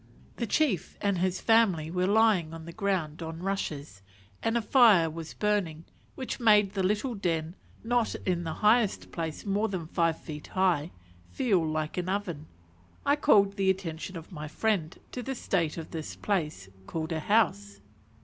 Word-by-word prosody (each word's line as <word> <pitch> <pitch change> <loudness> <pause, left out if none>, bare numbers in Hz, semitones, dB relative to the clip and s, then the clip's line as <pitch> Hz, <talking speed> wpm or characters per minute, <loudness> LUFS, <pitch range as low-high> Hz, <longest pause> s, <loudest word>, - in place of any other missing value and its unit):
The 235 - -2
chief 235 - 0
and 200 -3 0
his 185 0 0
family 195 -9 +3
were 180 +1 0
lying 200 -6 +3
on 160 -1 -9
the 170 - -7
ground 180 -7 -1
on 165 +1 -6
rushes, 155 - -3 0.4
and 225 +1 +1
a - - +1
fire 210 - +5
was 165 0 -8
burning, 190 -7 -1 0.3
which 260 - -5
made 210 -4 +5
the 195 - -1
little 210 +7 0
den, 170 -4 -2 0.3
not 235 0 +1
in 175 -2 0
the 160 -2 -3
highest 215 -1 +3
place 160 +1 -4
more 205 +2 +1
than 185 -4 -4
five 165 0 0
feet 150 -2 -8
high, 180 -5 +1 0.4
feel 210 -10 +1
like 155 +1 -2
an 180 +1 -3
oven. 180 -6 -3 0.6
I 285 - +4
called 200 -9 +4
the 195 -1 +2
attention 185 -1 -3
of 165 +4 -11
my 150 -3 -6
friend 175 0 -1
to 250 - -5
the 265 +2 -4
state 170 -9 -1
of 165 - -7
this 160 -2 -5
place 155 - -2 0.2
called 160 0 -4
a 160 - -1
"house." 125 - +1
185 Hz, 170 wpm, -28 LUFS, 160-210 Hz, 0.6 s, fire